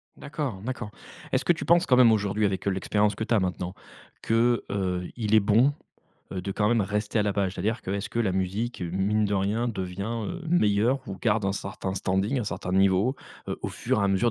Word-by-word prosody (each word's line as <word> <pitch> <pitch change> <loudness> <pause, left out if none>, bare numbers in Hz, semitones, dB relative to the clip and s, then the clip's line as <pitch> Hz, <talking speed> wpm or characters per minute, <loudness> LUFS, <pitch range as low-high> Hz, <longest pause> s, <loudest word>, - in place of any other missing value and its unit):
D'accord, 140 -9 -5
d'accord. 125 -3 -4 0.4
Est-ce 130 0 +1
que 175 - +5
tu 165 - -6
penses 170 +1 +4
quand 125 - +4
même 125 -3 +7
aujourd'hui 105 0 +1
avec, 95 -1 -1
heu, - - +3
l'expérience 105 +2 +1
que 105 - -4
tu 115 - +1
as - - +4
maintenant, 90 -1 -2 0.5
que, 115 +1 +2
heu, 90 -2 -1
il 110 -2 +1
est - - +8
bon, 110 +7 +4 0.6
heu, 95 -1 -4
de 100 - -3
quand 105 +1 +1
même 120 -2 +3
rester 105 +2 -1
à - - +4
la 105 -1 0
page? 100 -1 -1
C'est-à-dire, 110 +6 -1
que 95 - -6
est-ce 100 +2 -3
que 120 - -3
la 110 -5 +1
musique, 95 +5 -2
mine 95 +5 0
de 100 - -1
rien, 105 +5 0
devient, 100 +3 -4
heu, 180 0 -6
meilleure 120 -5 +2
ou 95 - -5
garde 105 -2 +1
un 95 - +1
certain 95 -1 -4
standing, 95 +7 0
un - - -3
certain 90 -3 -4
niveau, 95 +7 +3 0.3
heu, - - -3
au - - -2
fur - - -1
et - - +2
à - - +2
mesure 95 +5 +2
105 Hz, 230 wpm, -26 LUFS, 95-115 Hz, 0.6 s, est